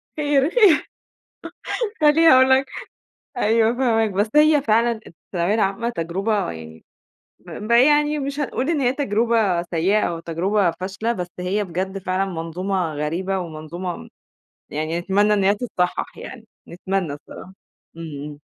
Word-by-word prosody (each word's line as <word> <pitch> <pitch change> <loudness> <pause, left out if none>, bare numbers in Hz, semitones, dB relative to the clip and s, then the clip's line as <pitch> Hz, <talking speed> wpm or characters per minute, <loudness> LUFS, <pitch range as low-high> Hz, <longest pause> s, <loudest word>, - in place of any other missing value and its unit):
خير، 290 -1 +2
خير. 390 -8 +4 1.1
خلّيني 310 +2 +5
أقول 260 0 +6
لك 265 +1 +4 0.7
أيوه 225 +1 +3
فاهماك، 230 -3 +1
بس 205 +3 0
هي 300 -1 +5
فعلًا 230 -2 +1
الثانوية 175 +3 -3
العامة 215 +2 0
تجرُبة 195 - -2
يعني 80 0 -11 0.5
ب - - -14 0.2
ب - - -3
يعني 295 +5 +4
مش 280 +1 -4
هنقول 275 -1 -2
إن 310 -4 0
هي 250 0 +2
تجربة 225 -7 +1
سيّئة 180 +5 +1
أو 170 -1 -2
تجربة 175 +3 0
فاشلة، 195 +7 -3
بس 180 -5 -4
هي 190 +4 -1
بجد 190 +1 -4
فعلًا 190 0 -1
منظومة 180 0 -3
غريبة 170 +6 -2
ومنظومة 170 +1 -6 0.6
يعني 155 +3 -2
نتمنى 200 +4 +2
إن 200 - +1
هي 200 +2 +4
تتصحّح 200 -6 -3
يعني، 240 -3 -9 0.2
نتمنى 180 -2 -3
الصّراحة. 145 +5 -11 0.4
إمم، 155 -4 -7
إمم. 150 -1 -9
195 Hz, 140 wpm, -21 LUFS, 175-240 Hz, 1.1 s, أقول